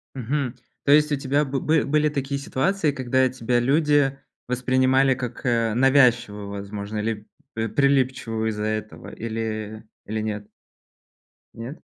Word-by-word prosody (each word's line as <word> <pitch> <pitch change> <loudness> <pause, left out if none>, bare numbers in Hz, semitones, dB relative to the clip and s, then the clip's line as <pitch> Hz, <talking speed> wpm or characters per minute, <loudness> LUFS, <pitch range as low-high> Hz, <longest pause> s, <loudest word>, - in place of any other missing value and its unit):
Мгм. 130 0 -2 0.3
То 140 - +4
есть, 150 0 +5
у - - +2
тебя 140 +2 +1
бы 135 -1 -2
бы 155 0 +2
были 150 +2 +2
такие 140 -1 -2
ситуации, 155 +5 0
когда 130 -1 +1
тебя 120 -1 0
люди 145 0 +2 0.3
воспринимали 130 +1 +3
как, 125 0 -6
э, 115 -2 +1
навязчивую, 120 -6 +3
возможно, 100 +1 -5
или 105 0 -3 0.3
прилипчивую 125 -1 +1
из-за 105 -1 -3
этого, 110 0 -4
или 110 -1 -4 0.2
или 110 +1 -3
нет? 105 -1 -4 1.1
Нет? 120 +7 -8
125 Hz, 130 wpm, -24 LUFS, 110-140 Hz, 1.1 s, есть